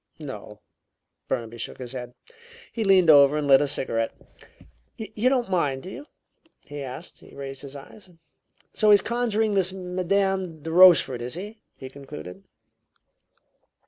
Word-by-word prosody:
"No." - - -9 0.7
Burnaby 120 -2 -4
shook - - -6
his 125 -2 -8
head. 125 -1 -8 0.6
He 230 - -2
leaned 190 -5 +5
over 140 0 +6
and 150 - -2
lit 135 0 +6
a 145 - +1
cigarette. 115 -4 -1 0.9
"You 220 +2 -1
don't 255 -4 0
mind, 145 -8 -1
do 185 - -8
you?" 290 - -10 0.5
he 145 0 -9
asked. 130 -1 -9
He - - -17
raised 135 -1 -7
his 140 0 -9
eyes. 185 +8 -13 0.6
"So 215 - +2
he's 205 -1 +6
conjuring 225 -3 0
this 190 -2 +1
Madame 185 -2 -2
de 160 - -5
Rochefort, 170 -8 +6
is 125 +4 -4
he?" 210 +5 -8 0.2
he 130 - -9
concluded. 130 - -10
165 Hz, 145 wpm, -24 LUFS, 135-195 Hz, 0.9 s, over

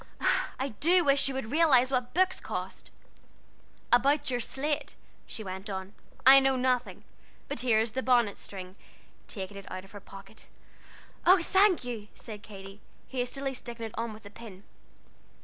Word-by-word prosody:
I 265 +2 -1
do 355 +3 +4
wish 275 -1 +4
you 270 - -2
would 245 -4 -4
realize 275 -5 +4
what 250 0 -1
books 370 +1 +2
cost! - - -6 1.0
"About 280 +3 +3
your 245 - 0
slate," 285 +5 -2 0.3
she 220 - -4
went 190 +1 -7
on, 190 0 -5 0.3
"I 270 +1 +10
know 270 0 +2
nothing; 250 -6 -1 0.4
but - - -4
here 235 -3 +3
is 225 0 0
the 260 - -2
bonnet 240 -5 +2
string;" 185 -1 -8 0.5
taking 200 -1 -7
it 195 - -10
out 185 - -6
of 195 - -18
her 205 - -9
pocket. 195 +2 -14 0.8
"Oh, 370 +2 +6
thank 385 -2 +4
you!" 230 -4 -6
said 215 -3 -9
Katy, 195 -1 -11 0.3
hastily 265 +2 -2
sticking 235 -2 -6
it 220 - -8
on 230 0 -3
with 215 0 -13
a 205 - -11
pin. 205 -3 -12
245 Hz, 165 wpm, -29 LUFS, 205-270 Hz, 1.0 s, I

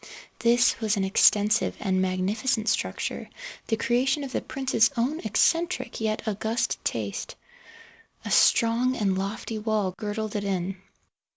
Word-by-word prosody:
This 240 +1 +3
was 215 -2 0
an 195 - 0
extensive 210 +3 +3
and 190 -2 0
magnificent 210 +6 -1
structure, - - -2 0.4
the 225 - +1
creation 260 +5 +1
of 270 - -6
the - - -2
prince's 260 -3 +1
own 265 +7 0
eccentric 260 - 0
yet 220 0 -2
august 220 +3 -1
taste. - - -3 0.9
A - - -4
strong 240 +2 +3
and 200 -5 0
lofty 200 +3 -4
wall 210 -3 -1
girdled 215 0 -4
it 205 - -1
in. 190 -1 -2
220 Hz, 130 wpm, -26 LUFS, 205-240 Hz, 0.9 s, This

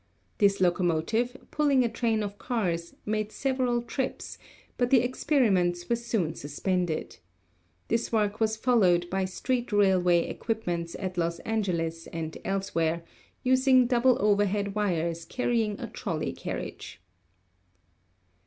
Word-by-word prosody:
This 200 -1 +4
locomotive, 185 +7 +1
pulling 285 -4 +3
a - - +2
train 225 -1 0
of 205 0 -6
cars, 175 -8 -2
made 215 0 -1
several 255 -3 0
trips, 260 +2 -4 0.4
but 245 -1 +1
the 255 -3 +6
experiments 195 - +1
were 235 - +3
soon 225 -8 -1
suspended. 170 - -2 0.7
This 230 +1 0
work 210 -2 +1
was 220 -1 +1
followed 190 -8 +3
by 190 0 0
street 240 +6 -2
railway 185 -4 +3
equipments 175 -7 -3
at 185 -2 -4
Los 170 0 0
Angeles 170 -7 -2
and 160 -1 -5
elsewhere, 170 -4 -1 0.4
using 255 0 +5
double 245 +1 +3
overhead 205 0 +2
wires 170 -5 -1
carrying 225 0 -1
a - - -4
trolley - - -3
carriage. - - -6
205 Hz, 120 wpm, -28 LUFS, 175-240 Hz, 0.7 s, the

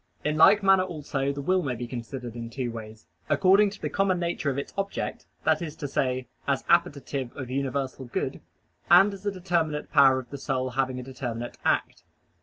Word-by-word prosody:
In 150 0 0
like 200 +6 +6
manner 195 -1 +6
also 145 -6 -2
the 140 0 -5
will 185 +4 +2
may 130 -6 -2
be 120 +1 -5
considered 120 0 -6
in 115 -1 -6
two 120 0 -3
ways: 110 -1 -9 0.2
according 195 +2 +5
to 200 0 -11
the - - -2
common 195 -2 +1
nature 170 -4 -1
of 135 - -2
its 140 - -5
object 195 0 -3 0.2
that - - +2
is 155 -3 -5
to 145 - -5
say, 130 -2 -1 0.2
as 140 -1 +1
appetitive 145 -7 +1
of 130 -3 -6
universal 135 0 -2
good 120 - -3 0.5
and 200 +1 +7
as 195 +1 -7
a - - +2
determinate 170 -5 -1
power 135 -3 +6
of 125 -2 -7
the 140 - -6
soul 130 -2 -2
having 130 0 -1
a - - -6
determinate 120 -2 -6
act. - - 0
140 Hz, 200 wpm, -27 LUFS, 130-175 Hz, 0.5 s, and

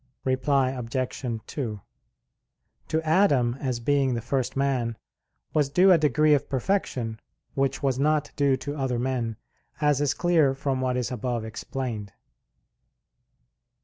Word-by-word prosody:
Reply 130 0 +2
Obj. 130 +1 -4 0.2
2: 115 -8 -4 1.1
To 160 - 0
Adam, 155 -8 +3
as 130 -3 -2
being 135 0 +1
the 115 - -2
first 130 +2 -2
man, 125 -5 0 0.6
was 150 -3 +2
due 180 +7 +5
a 175 - +6
degree 150 +1 +4
of 145 -1 +1
perfection 130 - -1 0.3
which 135 0 -1
was 135 -2 +1
not 150 0 +1
due 140 -2 +2
to 145 +2 -5
other 130 -4 -1
men, 120 -3 -2 0.4
as 150 -2 +2
is 145 -2 +1
clear 160 -6 +3
from 135 -1 -1
what 130 -1 0
is 125 0 -2
above 120 -1 -2
explained. 110 -2 -5
135 Hz, 135 wpm, -26 LUFS, 125-145 Hz, 1.1 s, a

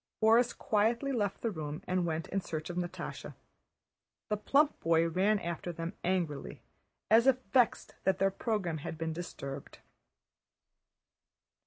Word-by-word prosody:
Borís 230 +2 +4
quietly 230 +6 +1
left 205 -6 -1
the 230 - 0
room 155 -3 -5
and 180 -1 0
went 160 0 -2
in 195 - -1
search 155 -1 -4
of - - -7
Natásha. 175 -1 -5 0.9
The 210 - +1
plump 285 +7 +3
boy 165 0 +3
ran 195 +6 +2
after 170 -1 -4
them 165 0 -5
angrily, 175 -5 -2 0.5
as 230 +3 +6
if 265 -1 +6 0.2
vexed 250 -3 +3
that 190 -1 +2
their 195 0 +2
program 195 -6 -1
had 155 - -6
been 160 0 -2
disturbed. 140 -5 -7
185 Hz, 140 wpm, -32 LUFS, 165-220 Hz, 0.9 s, as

